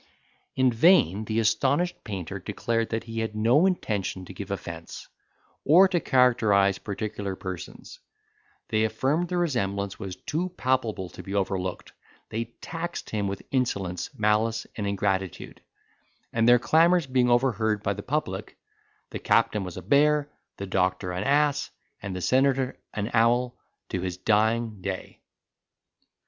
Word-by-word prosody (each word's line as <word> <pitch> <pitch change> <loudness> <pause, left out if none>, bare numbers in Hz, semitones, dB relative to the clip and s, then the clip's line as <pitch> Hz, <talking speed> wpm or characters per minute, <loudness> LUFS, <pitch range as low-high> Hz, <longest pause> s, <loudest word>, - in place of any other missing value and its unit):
In 130 -1 +3
vain 115 - +4
the 110 +1 0
astonished 140 +10 +1
painter 100 -2 -5
declared 115 +4 -2
that 115 0 -2
he 115 -1 -5
had 110 -1 -3
no 120 - +4
intention 100 - -2
to 95 - -10
give 100 +1 -7
offence, 85 -4 -7 0.6
or 180 +7 +7
to 180 -2 +1
characterise 110 - +3
particular 100 -2 -4
persons: 95 -2 -8 0.7
they 110 0 +2
affirmed 135 +10 0
the 180 - -1
resemblance 100 - -1
was 95 -2 -5
too 165 - -3
palpable 120 -7 0
to - - -10
be 100 - -6
overlooked; 95 -2 -2 0.4
they 115 +2 -2
taxed 165 +9 -6
him 105 -2 -1
with 100 0 -5
insolence, 100 -9 -1
malice, 110 +2 +1
and 105 -2 -3
ingratitude; 95 -2 -2 0.7
and 115 +1 +3
their 120 - +8
clamours 165 +6 +4
being 130 -2 +2
overheard 115 -4 +1
by - - 0
the - - -7
public, - - -3 0.5
the - - -5
captain 105 -2 +2
was 90 -2 -7
a - - -7
bear, 150 0 +3 0.3
the 100 - -5
doctor 90 -1 0
an 90 +2 -3
ass, 145 +3 +2 0.3
and 100 -2 -5
the 90 - -4
senator 130 +3 +2 0.2
an 105 +1 -3
owl, 120 +2 +3 0.3
to 90 - -2
his 90 -1 -3
dying 110 +1 +1
day. 95 0 -6
110 Hz, 145 wpm, -26 LUFS, 100-130 Hz, 0.7 s, their